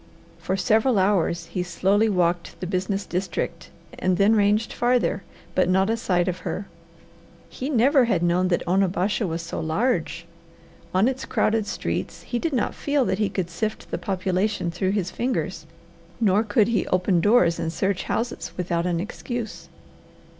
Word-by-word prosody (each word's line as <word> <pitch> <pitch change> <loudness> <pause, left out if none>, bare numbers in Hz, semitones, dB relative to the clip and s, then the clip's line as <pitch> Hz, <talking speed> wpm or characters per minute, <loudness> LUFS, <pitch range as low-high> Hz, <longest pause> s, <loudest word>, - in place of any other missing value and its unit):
For 190 - -2
several 220 +5 +3
hours 185 -3 +2
he 180 - -3
slowly 195 +5 +2
walked 175 -3 0
the 185 - -4
business 190 +2 -2
district 180 -1 -3 0.3
and 185 -1 +1
then 205 +3 +4
ranged 210 +2 +2
farther, 245 -4 +1 0.3
but 185 -1 +2
not 190 +3 +3
a - - +2
sight 180 -6 0
of 185 0 -2
her. 200 - -4 0.8
He 265 - -5
never 270 0 +4
had 190 -7 +1
known 175 +2 +2
that 180 - 0
Onabasha 190 +3 +1
was 165 0 -3
so 165 - -5
large. 190 +11 -1 0.7
On 190 +5 +3
its 260 0 -2
crowded 220 -2 +1
streets - - -3
he 240 - -3
did 330 - -1
not 250 -5 0
feel 285 -2 0
that 190 -1 -1
he 210 - +1
could 180 -3 -3
sift 215 +5 -4
the - - -2
population 190 -1 -1
through 185 +3 -1
his 190 -3 -1
fingers, 200 -10 -2 0.5
nor 205 -2 +3
could 220 0 +2
he 230 - 0
open 180 -1 +2
doors 205 -6 +4
and 160 - -2
search 190 +2 -1
houses 235 +1 -3
without 175 -1 -1
an 170 -2 0
excuse. 225 +4 -5
195 Hz, 165 wpm, -24 LUFS, 180-220 Hz, 0.8 s, then